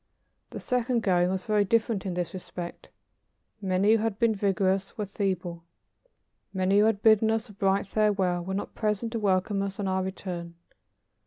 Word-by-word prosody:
The - - -7
second 250 -2 0
going 180 -2 +3
was 190 0 -2
very 210 -1 +3
different 220 -1 0
in 180 - -3
this 175 -2 -3
respect. 180 -1 -7 0.7
Many 190 +2 +2
who 225 - +6
had 220 -2 -1
been 230 -1 +3
vigorous 195 -1 0
were 210 - -2
feeble. 185 -4 -3 0.9
Many 190 +1 +2
who 210 - +5
had 220 -2 +1
bidden 220 0 +5
us 225 +1 -1
a - - -12
bright 195 0 +1
farewell 195 -4 +1
were 190 +2 -3
not 205 - -4
present 215 +1 -1
to 230 - -2
welcome 195 0 +1
us 195 0 -4
on 200 - -1
our 190 0 0
return. 180 -2 -5
195 Hz, 175 wpm, -27 LUFS, 185-215 Hz, 0.9 s, who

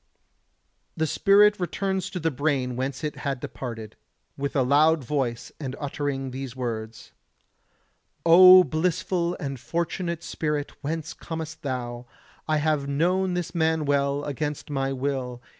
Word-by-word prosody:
The 160 - +1
spirit 205 +5 +4
returns 190 +1 -2
to 185 - -5
the 165 -1 0
brain 135 -3 -1
whence 130 +3 -3
it 150 - -3
had 140 -3 -3
departed, 115 -4 -7 0.4
with 140 +1 -4
a 135 - +3
loud 150 +3 +4
voice 125 -3 -2
and 135 -3 -4
uttering 140 -2 -3
these 130 -1 -6
words: 115 -3 -5 1.1
O 185 +2 +9
blissful 170 +2 -1
and 135 -2 -4
fortunate 170 +3 -3
spirit, 150 -2 -2
whence 160 +2 -3
comest 160 -1 -7
thou? 120 -3 -4 0.4
I 155 -1 +2
have 150 -2 0
known 180 +5 +1
this 175 -2 -3
man 160 -2 +1
well, 140 0 +1
against 150 +1 -4
my 135 -1 -1
will. 130 -2 -3
145 Hz, 135 wpm, -25 LUFS, 135-165 Hz, 1.1 s, O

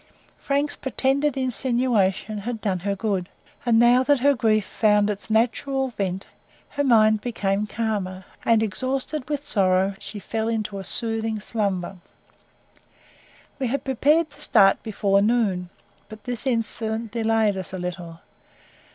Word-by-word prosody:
Frank's 285 +1 -1
pretended 275 +1 0
insinuation 235 -5 0
had 230 +2 -4
done 195 -4 -1
her 200 +3 -2
good; 195 -3 -2 0.4
and 230 -1 +4
now 240 +2 +6
that 280 -1 +2
her 285 +2 +5
grief 215 -5 +1
found 210 0 +2
its 205 +2 -7
natural 260 +4 +1
vent, 195 -4 -3 0.4
her 285 -1 -2
mind 215 -4 +4
became 210 -3 -1
calmer, 200 -4 -3 0.2
and 225 -1 +3
exhausted 260 +6 -3
with 295 -1 -3
sorrow, 190 -4 +2
she 215 - -7
fell 220 +2 -3
into 215 -3 -2
a - - -6
soothing 225 +1 -1
slumber. 195 -4 -2 1.6
We 260 - 0
had 275 +4 -2
prepared 295 +5 +2
to - - -13
start 195 -3 +5
before 200 -2 +1
noon, 205 -5 +1 0.4
but 215 0 -11
this 245 +1 -3
incident 225 -2 -1
delayed 225 -2 +1
us 190 -2 -6
a 190 - -5
little. 175 -2 -6
220 Hz, 140 wpm, -24 LUFS, 200-250 Hz, 1.6 s, now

